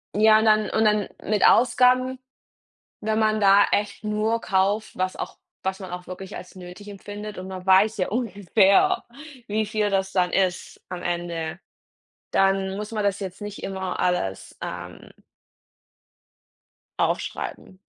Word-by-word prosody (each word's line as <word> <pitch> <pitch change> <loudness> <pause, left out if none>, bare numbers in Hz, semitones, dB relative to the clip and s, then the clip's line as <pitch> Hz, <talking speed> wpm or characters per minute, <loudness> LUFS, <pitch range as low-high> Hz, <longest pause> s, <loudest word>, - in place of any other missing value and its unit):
ja, 215 +1 +6
und 220 - +1
dann 215 -1 +4
und 220 0 +1
dann 210 -1 +2 0.2
mit 210 -1 +3
Ausgaben, 255 +2 +4 0.8
wenn 220 +1 0
man 215 0 +2
da 200 0 +6
echt 205 0 -1
nur 215 +2 0
kauft, 200 +3 0
was 185 0 -1
auch - - -6 0.2
was 190 +1 -2
man 185 -2 -7
auch 180 0 -7
wirklich 190 +2 -8
als 180 - -10
nötig 185 +3 -11
empfindet 205 +1 -8
und 185 +1 -7
man 185 0 -8
weiß 195 +4 +5
ja 185 - 0
ungefähr, 210 - +2 0.4
wie 215 +1 0
viel 210 -1 0
das 190 0 0
dann 180 -2 +2
ist 185 -2 -1
am 180 -1 -6
Ende. 170 -1 -3 0.7
Dann 195 0 +2
muss 210 +1 -5
man 215 -2 -2
das 200 0 0
jetzt 190 +1 -7
nicht 205 0 -7
immer 190 -1 -4
alles, 180 - -1
ähm - - -7 1.9
Aufschreiben. 185 - -3
200 Hz, 145 wpm, -24 LUFS, 185-215 Hz, 1.9 s, ja